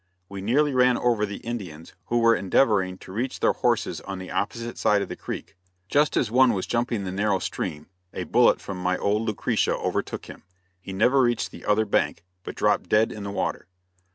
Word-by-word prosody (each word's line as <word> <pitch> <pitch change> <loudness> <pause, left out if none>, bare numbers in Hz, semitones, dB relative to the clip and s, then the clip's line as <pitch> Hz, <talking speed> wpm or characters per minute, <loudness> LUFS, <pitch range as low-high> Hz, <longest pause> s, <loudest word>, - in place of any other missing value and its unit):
We 100 -1 -7
nearly 140 +8 +2
ran 125 -1 +4
over 115 -4 +1
the 100 - -6
Indians 95 -10 -6
who 120 - 0
were 115 -1 +5
endeavoring 95 -3 +2
to 95 - -12
reach 120 +6 -3
their - - +3
horses - - 0
on 95 -1 -6
the 95 0 -8
opposite 115 +3 -3
side 105 -1 +3
of - - -8
the - - -5
creek. - - -7 0.3
Just 150 +1 +2
as 115 - +1
one 125 0 +5
was 95 -3 -2
jumping 120 -3 -1
the 95 - -4
narrow 100 +1 +1
stream 75 -4 -4 0.3
a - - -4
bullet - - +4
from 95 -2 -7
my 90 0 +1
old 105 +2 +1
"Lucretia" 105 - 0
overtook - - -3
him. - - -11 0.4
He 95 - -8
never 125 +8 +3
reached 120 -2 +1
the - - -11
other 105 +1 +2
bank, 100 - 0 0.2
but - - -8
dropped - - +1
dead 110 +1 +3
in 105 - -7
the 100 - -5
water. 100 - -3
105 Hz, 205 wpm, -25 LUFS, 95-120 Hz, 0.4 s, were